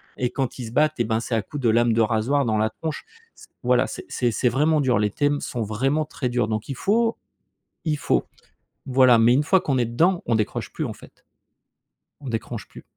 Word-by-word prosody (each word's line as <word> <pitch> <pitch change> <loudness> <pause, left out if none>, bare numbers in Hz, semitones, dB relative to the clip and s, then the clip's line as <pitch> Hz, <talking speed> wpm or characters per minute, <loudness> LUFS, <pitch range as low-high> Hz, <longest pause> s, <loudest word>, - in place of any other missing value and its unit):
et 125 - -1
quand 135 -3 -3
ils 120 - -5
se - - -9
battent 150 +3 +1
et - - +3
ben 110 0 0
c'est 115 0 -3
à 110 - +1
coup 145 - -8
de 120 -4 +2
lames 120 +1 +3
de 115 - +2
rasoir 115 +6 +1
dans 110 -2 +1
la 110 +1 +1
tronche 155 +7 -5 0.3
s - - -16 0.2
voilà, - - +3
c'est - - -8
c'est 120 - 0
c'est 125 +3 +1
vraiment 150 +5 +2
dur. 125 -6 +2
Les 105 0 +1
thèmes 145 +4 0
sont 120 - -4
vraiment 135 +9 0
très 130 -4 -4
durs, 120 -2 0
donc 110 +1 -3
il 135 - -3
faut 225 - +1 0.7
il 155 -3 0
faut. 130 - +1 0.6
Voilà, 130 -2 +5
mais 115 +2 +5
une 140 +4 +3
fois 190 +4 +3
qu'on 135 -3 0
est 120 - +2
dedans, 170 +11 +1
on 115 - +2
décroche 110 -1 -2
plus - - -3
en - - -4
fait. - - -18 1.0
On 140 - -8
décroche 115 -2 -4
plus. - - -13
125 Hz, 230 wpm, -23 LUFS, 115-145 Hz, 1.0 s, Voilà